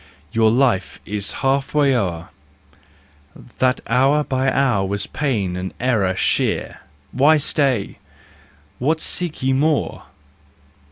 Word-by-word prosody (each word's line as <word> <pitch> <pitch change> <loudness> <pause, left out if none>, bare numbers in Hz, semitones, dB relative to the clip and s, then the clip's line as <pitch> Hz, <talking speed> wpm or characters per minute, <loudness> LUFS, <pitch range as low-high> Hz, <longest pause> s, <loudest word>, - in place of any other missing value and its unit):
Your 110 -1 +3
life 120 -4 +1
is 100 -1 -2
half 135 +2 0
way 140 -3 +3
o'er; 90 -8 -2 1.3
That 130 0 +2
hour 135 +5 +2
by 135 -1 0
hour 125 -8 +1
was 100 +1 -1
pain 105 -11 -2
and 90 +1 -5
error 110 -7 +1
sheer: - - -1 0.3
Why 150 +4 +4
stay? 135 -7 -1 0.8
What 155 +5 +1
seek 170 -3 -2
you 130 0 +2
more 150 +2 0
130 Hz, 115 wpm, -20 LUFS, 100-140 Hz, 1.3 s, Why